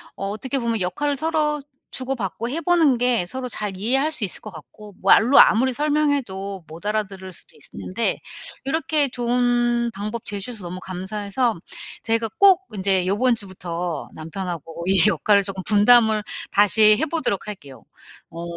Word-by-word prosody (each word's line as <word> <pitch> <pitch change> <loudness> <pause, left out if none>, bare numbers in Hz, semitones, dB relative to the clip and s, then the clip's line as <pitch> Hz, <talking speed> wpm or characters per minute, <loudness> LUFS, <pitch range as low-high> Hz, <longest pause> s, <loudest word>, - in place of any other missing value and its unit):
어 195 - -4
어떻게 260 +7 -3
보면 230 -3 -1
역할을 285 +11 -1
서로 300 0 0 0.3
주고받고 240 -3 -3
해 300 - -2
보는 330 -6 +3
게 240 -5 +1
서로 255 +7 -5
잘 210 -5 -5
이해할 270 +10 +1
수 275 -9 -1
있을 185 - -4
것 215 - -9
같고. 180 - -13
말로 225 +7 +6
아무리 255 +4 +5
설명해도 260 - -1
못 165 +5 -12
알아들을 200 -3 -3
수도 - - -12
있었는데 225 +5 -3 0.5
요렇게 300 0 +1
좋은 240 -1 +1
방법 215 +3 -5
제시해서 205 +1 -5
너무 180 +1 -6
감사해서 200 +5 -2 0.5
제가 225 0 0
꼭 385 -2 +6
인제 190 -2 +1
요번 235 +6 +2
주부터 180 -5 -5
남편하고 165 0 -6
이 190 -2 +4
역할을 205 -2 +2
쪼금 190 -1 -5
분담을 220 +1 +5 0.3
다시 210 +1 +5
해 315 - 0
보도록 295 - -2
할게요. 140 - -10 0.5
어 170 +1 -8
215 Hz, 325 characters per minute, -22 LUFS, 190-255 Hz, 0.5 s, 말로